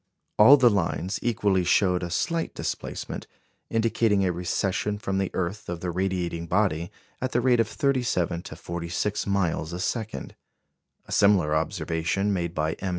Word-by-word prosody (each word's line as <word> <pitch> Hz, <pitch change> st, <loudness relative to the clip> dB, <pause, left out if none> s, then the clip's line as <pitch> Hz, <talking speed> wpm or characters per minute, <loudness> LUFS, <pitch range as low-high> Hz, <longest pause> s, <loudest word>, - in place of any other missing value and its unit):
All 130 Hz, +7 st, +9 dB
the 125 Hz, -3 st, +5 dB
lines 95 Hz, 0 st, -1 dB
equally 100 Hz, -5 st, +1 dB
showed 90 Hz, 0 st, +3 dB
a 90 Hz, -, -3 dB
slight 165 Hz, -, -1 dB
displacement, -, -, -5 dB, 0.4 s
indicating 110 Hz, -3 st, +2 dB
a 90 Hz, -, +2 dB
recession 90 Hz, +4 st, -1 dB
from 95 Hz, -2 st, -2 dB
the 95 Hz, -, 0 dB
earth 95 Hz, +2 st, -3 dB
of 85 Hz, -1 st, -4 dB
the 90 Hz, -, -2 dB
radiating 90 Hz, -2 st, -2 dB
body 90 Hz, -3 st, 0 dB, 0.3 s
at 130 Hz, 0 st, -2 dB
the 120 Hz, -, +3 dB
rate 125 Hz, -1 st, +3 dB
of 115 Hz, -, +3 dB
37 120 Hz, -, 0 dB
to 80 Hz, -, -9 dB
46 85 Hz, +5 st, -3 dB
miles 90 Hz, -4 st, 0 dB
a 90 Hz, -, -4 dB
second. 110 Hz, +3 st, -3 dB, 0.7 s
A -, -, -13 dB
similar 95 Hz, -7 st, +4 dB
observation, 85 Hz, +4 st, -1 dB
made 85 Hz, -2 st, -2 dB
by 80 Hz, +1 st, 0 dB
M. 95 Hz, -, -3 dB
95 Hz, 155 wpm, -26 LUFS, 85-105 Hz, 0.7 s, All